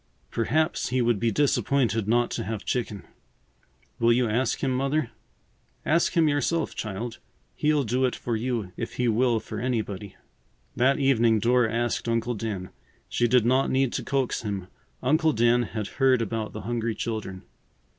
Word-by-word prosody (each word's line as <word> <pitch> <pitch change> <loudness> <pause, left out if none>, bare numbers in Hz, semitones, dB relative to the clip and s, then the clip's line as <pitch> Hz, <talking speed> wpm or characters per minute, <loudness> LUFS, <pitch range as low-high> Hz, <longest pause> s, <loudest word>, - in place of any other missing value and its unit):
Perhaps 155 +7 0
he 130 +1 0
would 120 -3 +2
be 115 - +2
disappointed 120 -3 +1
not 120 +2 +2
to 115 - -2
have 110 0 -5
chicken. 110 -5 -2 1.0
Will 115 0 +4
you 120 +1 +3
ask 115 +3 0
him, 135 - +1
Mother?" 135 0 0 0.7
"Ask 170 +2 +2
him 165 -2 +4
yourself, 150 +2 0
child. 110 +2 -5 0.4
He'll 150 -1 +2
do 125 +3 +1
it 125 - -1
for 120 - -3
you 115 -4 -2
if - - -4
he 125 - 0
will 115 +1 +2
for 110 0 -7
anybody." 110 -5 -3 0.6
That 135 +3 +3
evening 120 -5 +3
Dora 120 +1 +2
asked 120 0 -1
Uncle 115 +1 0
Dan. 105 -5 -4 0.4
She 120 - +1
did 120 -1 +4
not 130 +3 +3
need 130 -1 +1
to - - -2
coax 135 -3 -1
him. 100 -4 -4 0.3
Uncle 155 +4 +3
Dan 120 +1 +3
had 110 -2 -4
heard 130 0 +2
about 110 -1 -3
the 110 - -6
hungry 115 +1 -2
children. 105 -5 -4
120 Hz, 165 wpm, -26 LUFS, 110-130 Hz, 1.0 s, Will